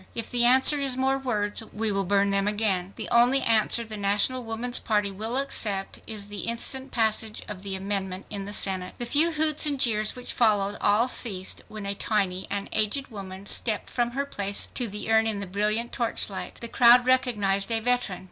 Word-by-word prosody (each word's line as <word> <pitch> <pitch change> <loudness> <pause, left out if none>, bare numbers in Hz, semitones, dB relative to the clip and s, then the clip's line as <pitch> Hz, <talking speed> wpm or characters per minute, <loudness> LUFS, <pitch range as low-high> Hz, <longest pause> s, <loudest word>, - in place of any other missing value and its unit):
If 230 -1 -4
the 240 -1 +2
answer 265 +4 +5
is 270 -2 +1
more 265 +1 0
words 210 -6 -1
we 220 0 -2
will 195 -1 -1
burn 200 +1 +1
them 200 0 +1
again. 200 -3 +1
The - - -6
only 245 +3 +4
answer 225 +1 +2
the 220 -1 -6
National 205 +6 0
Woman's 230 +2 -1
Party 210 -2 -1
will 220 +6 -4
accept 210 -8 0
is 210 -2 -5
the 205 0 -8
instant 260 +3 -2
passage 220 -2 0
of 200 -3 -8
the 195 -1 -4
amendment 190 -1 -3
in 200 -2 -5
the 205 - -6
Senate." 190 -3 -1
The 240 - -4
few 295 +7 +3
hoots 310 0 +2
and 285 -2 -2
jeers 215 -4 +1
which 250 0 -3
followed 205 -3 +1
all 210 +4 +3
ceased, 195 -7 +1
when 215 -2 -7
a 200 - -1
tiny 195 -3 -1
and 200 0 -3
aged 220 +6 -1
woman 195 -3 -9
stepped 215 +1 +1
from 240 -1 -1
her 280 - -1
place 200 -7 0
to 245 - -1
the 210 +1 -5
urn 220 0 +3
in 215 -2 -1
the 200 - -5
brilliant 210 +5 -1
torch 235 -3 -1
light. 190 - -7
The 235 - -4
crowd 245 +1 +5
recognized 210 -6 +1
a 225 - +2
veteran. 245 -5 -1
215 Hz, 205 wpm, -25 LUFS, 200-245 Hz, -, answer